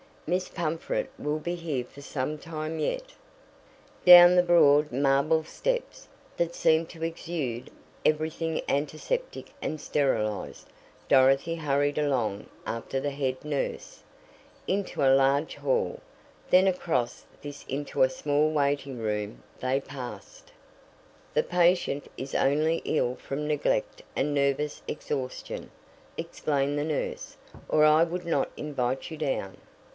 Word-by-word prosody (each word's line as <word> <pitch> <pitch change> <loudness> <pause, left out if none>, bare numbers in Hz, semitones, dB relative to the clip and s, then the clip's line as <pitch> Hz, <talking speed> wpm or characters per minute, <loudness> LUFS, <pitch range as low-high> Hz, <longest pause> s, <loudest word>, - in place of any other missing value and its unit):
"Miss 180 +3 0
Pumfret 165 -1 -2
will 150 +1 -1
be 175 +3 -3
here 160 -7 -3
for 140 +3 -14
some 145 +1 -3
time 155 0 -5
yet." - - -2 0.9
Down 175 0 +10
the 180 - +7
broad 150 -4 +5
marble 140 +4 +2
steps, - - -3 0.3
that 170 0 -1
seemed 160 0 +3
to 165 -2 -8
exude 160 -7 -4 0.4
everything 160 +1 0
antiseptic 155 - -2
and 155 - -3
sterilized, 110 -10 -1 0.4
Dorothy 135 +5 +4
hurried 145 -2 0
along 125 -9 0 0.2
after 115 +3 -3
the 145 - -1
head 135 -2 -2
nurse. 150 -2 -4 0.7
Into 195 -5 -1
a 135 -1 +6
large 135 +3 +2
hall, 485 -1 0 0.5
then 185 +1 +6
across 170 -10 -1 0.2
this 145 -1 -9
into 140 +2 -3
a 130 - +6
small 145 +3 +1
waiting 140 -3 0
room 105 -1 -3 0.2
they 130 +2 0
passed. 130 -3 -9 0.8
"The - - +3
patient 175 -5 +2
is 135 +1 -7
only 155 +4 +2
ill 125 -5 +1
from 140 +3 -5
neglect - - 0
and 145 - 0
nervous 140 +1 0
exhaustion," 135 -4 -5 0.5
explained 145 0 -1
the 145 - -1
nurse, 155 -2 -3 0.3
"or 155 - +3
I 155 +1 +6
would 175 +1 -3
not 155 -5 +1
invite 135 -1 -3
you 160 - -6
down." 135 -10 -2
150 Hz, 125 wpm, -27 LUFS, 135-165 Hz, 0.9 s, Down